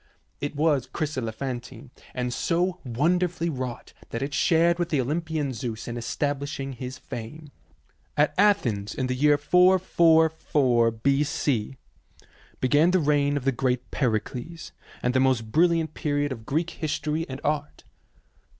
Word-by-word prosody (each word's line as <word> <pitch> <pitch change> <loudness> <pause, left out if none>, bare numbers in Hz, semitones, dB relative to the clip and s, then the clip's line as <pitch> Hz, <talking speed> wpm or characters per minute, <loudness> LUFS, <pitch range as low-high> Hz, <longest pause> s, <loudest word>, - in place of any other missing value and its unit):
It 145 +1 -4
was 145 -4 +2
chryselephantine, 130 -3 -5 0.2
and 125 -1 -2
so 175 +7 0
wonderfully 170 +7 0
wrought 130 -3 -6 0.2
that 115 - -3
it 140 +1 -4
shared 170 +1 +3
with 175 -1 -1
the 150 - +1
Olympian 150 +1 -1
Zeus 115 -1 -5
in 120 - -4
establishing 140 +2 -3
his 125 +1 -7
fame. 135 +4 -8 0.7
At 150 0 +3
Athens 125 - +2
in 130 - -1
the 130 - -1
year 145 +3 +4
444 160 -7 +3
B.C., 135 0 0 0.8
began 145 +6 +4
the 185 +1 +3
reign 145 -2 +2
of 135 - -5
the 135 - +3
great 125 -1 -1
Pericles, 125 +6 -2 0.3
and 125 - +1
the 130 - +3
most 130 -4 +1
brilliant 165 +1 +2
period 145 -1 -1
of 115 -3 -7
Greek 165 +4 -1
history 155 0 -2
and 130 0 -6
art. 150 0 -2
145 Hz, 135 wpm, -26 LUFS, 125-160 Hz, 0.8 s, year